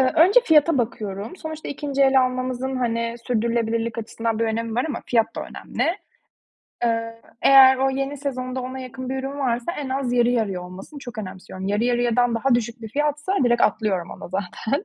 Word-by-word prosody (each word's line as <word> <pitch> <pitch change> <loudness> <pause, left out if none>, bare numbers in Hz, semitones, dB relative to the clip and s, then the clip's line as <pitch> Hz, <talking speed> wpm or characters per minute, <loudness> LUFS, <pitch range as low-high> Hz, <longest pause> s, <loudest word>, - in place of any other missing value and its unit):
Eee, 260 -1 +3
önce 380 +10 +7
fiyata 315 - +4
bakıyorum. 215 - -3
Sonuçta 315 -2 -7
2. 280 -1 -1
el 265 -1 +5
almamızın, 255 +1 -2
hani, 230 -1 -1
sürdürülebilirlik 230 -1 0
açısından 225 0 -3
bir 230 - +2
önemi 225 0 -2
var 245 - +1
ama - - -3
fiyat 230 -2 +1
da - - -2
önemli. - - -4 1.0
Eee, 230 0 -1 0.2
eğer 265 -1 +8
o 270 +1 +2
yeni 275 +2 -2
sezonda 255 -2 -3
ona 260 +1 -5
yakın 255 0 -7
bir 265 - -2
ürün 275 +2 -5
varsa, 245 +3 -1
en 285 -5 -5
az 260 -2 -1
yarı 240 -1 +3
yarıya 205 -7 0
olmasını 190 +11 -10
çok 245 -4 -9
önemsiyorum. 190 -1 -7
Yarı 210 +3 +1
yarıyadan 245 0 +2
daha 245 +2 +2
düşük 235 0 -2
bir 220 - -6
fiyatsa 295 - -1
direkt 240 0 +3
atlıyorum 195 -5 +1
ona - - -9
zaten. 200 - -3
245 Hz, 180 wpm, -23 LUFS, 230-270 Hz, 1.0 s, eğer